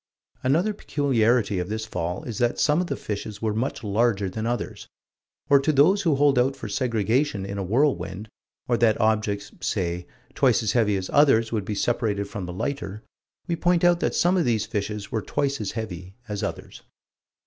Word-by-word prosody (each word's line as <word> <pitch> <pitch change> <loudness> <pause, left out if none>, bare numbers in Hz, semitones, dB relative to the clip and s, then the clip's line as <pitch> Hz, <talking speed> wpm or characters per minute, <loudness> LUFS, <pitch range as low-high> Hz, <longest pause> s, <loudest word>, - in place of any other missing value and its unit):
Another 165 +11 +2
peculiarity 120 - +1
of 90 +1 -3
this 110 +1 -3
fall 90 -3 -3
is 115 -5 -5
that 120 -1 +1
some 150 +3 +3
of 180 - -3
the 140 - -2
fishes 105 -2 -5
were 110 -1 -1
much 120 +3 -2
larger 105 -2 +1
than 110 +3 -3
others. 120 0 -4 0.6
Or 140 -2 +6
to 140 +3 +1
those 160 +8 +4
who 165 -6 +2
hold 140 -2 +4
out 135 +2 +2
for 115 - -7
segregation 115 0 0
in 100 0 -5
a - - -1
whirlwind, 110 -2 0 0.4
or 120 - +2
that 115 -2 +3
objects, 105 -2 0
say, 90 -4 -2 0.3
twice - - +3
as 110 - +1
heavy 105 -4 +2
as 95 -1 -5
others 115 -6 +4
would 105 -4 -1
be 105 - -3
separated 105 -3 0
from 100 -3 -6
the 90 - -5
lighter, 110 -1 -4 0.4
we 170 - -1
point 175 0 +2
out 175 -1 +5
that - - -1
some 180 +2 +3
of 175 - +2
these 115 -3 +1
fishes 105 0 -4
were 110 - -1
twice 140 +2 -1
as 100 - -3
heavy 95 -4 -6
as 105 -2 -4
others. - - -6
110 Hz, 190 wpm, -25 LUFS, 100-140 Hz, 0.6 s, Or